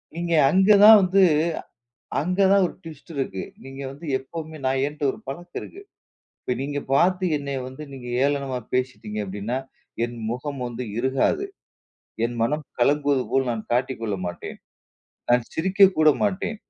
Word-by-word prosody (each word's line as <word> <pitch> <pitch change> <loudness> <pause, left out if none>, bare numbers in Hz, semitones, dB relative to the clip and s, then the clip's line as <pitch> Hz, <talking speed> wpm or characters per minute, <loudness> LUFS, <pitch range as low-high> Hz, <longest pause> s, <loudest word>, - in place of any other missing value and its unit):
நீங்க 170 0 -2 0.2
அங்க 190 +3 +3
தான் 215 +1 +11
வந்து, 190 +1 +3 1.0
அங்க 180 +6 -2
தான் 200 -2 +5
ஒரு - - -8
ட்விஸ்ட் 160 0 -11
இருக்கு. 130 -9 -3 0.2
நீங்க 135 +1 -9
வந்து 145 +5 -10
எப்போமே, 160 +3 -8
நான் 130 0 +1
என்கிட்ட 145 0 -5
ஒரு - - -11
பழக்கம் 175 +5 -6
இருக்குது. 400 +2 -11 0.6
இப்ப 125 - -1
நீங்க 145 +1 -2
பார்த்து 180 +5 +3
என்னை 140 -1 -4
வந்து 130 +4 -9
நீங்க 130 -2 -9 0.2
ஏளனமா 140 -3 -1
பேசிட்டீங்க 125 -4 -2
அப்டினா, 105 +6 -3 0.5
என் 120 0 -8
முகம் 130 +3 -4
வந்து 120 +1 -5 0.2
இருகாது. 130 - +1 0.8
என் 120 +1 -2
மனம் 150 +6 0 0.2
கலங்குவது 140 +1 +2
போல் 135 -1 +1
நான் 115 -2 -3
காட்டிக் 125 0 0
கொள்ள 105 -3 -2
மாட்டேன். 85 - -6 0.7
நான் 120 -1 +3
சிரிக்க 190 +4 +5
கூட 155 0 +6
மாட்டேன். 205 +2 -1
140 Hz, 150 wpm, -24 LUFS, 125-170 Hz, 1.0 s, தான்